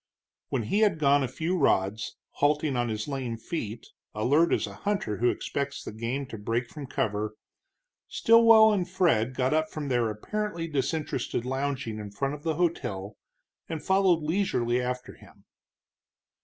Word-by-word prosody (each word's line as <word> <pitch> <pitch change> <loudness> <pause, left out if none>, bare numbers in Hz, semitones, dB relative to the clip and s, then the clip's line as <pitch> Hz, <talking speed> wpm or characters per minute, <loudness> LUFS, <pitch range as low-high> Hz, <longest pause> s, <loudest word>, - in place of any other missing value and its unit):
When 125 -4 -1
he 155 - 0
had 210 -6 +3
gone 145 -1 +4
a 135 - 0
few 160 +8 -2
rods, 105 - +1
halting 145 -1 +1
on 120 -1 0
his 110 -1 -3
lame 130 -5 -3
feet, 115 -3 -5 0.3
alert 145 +10 +3
as - - +2
a - - -8
hunter 200 - -2
who 120 +1 +3
expects 140 +2 -3
the - - -6
game 115 +6 -3
to 110 - -7
break 115 +3 -2
from 145 -3 -7
cover, 105 -4 -2 0.7
Stilwell 225 -2 +6
and 185 -4 -1
Fred 130 - +2
got 130 +2 +1
up 155 0 +1
from 150 -2 -5
their 120 -3 +2
apparently 170 - -3
disinterested 140 -4 -2
lounging 130 -4 -2
in 105 -1 -6
front 135 +8 -2
of 150 - -7
the 160 0 -1
hotel 120 - -2 0.5
and 160 -2 -4
followed 190 -4 +3
leisurely 140 -8 +1
after 125 0 -4
him. - - -19
135 Hz, 160 wpm, -27 LUFS, 115-165 Hz, 0.7 s, Stilwell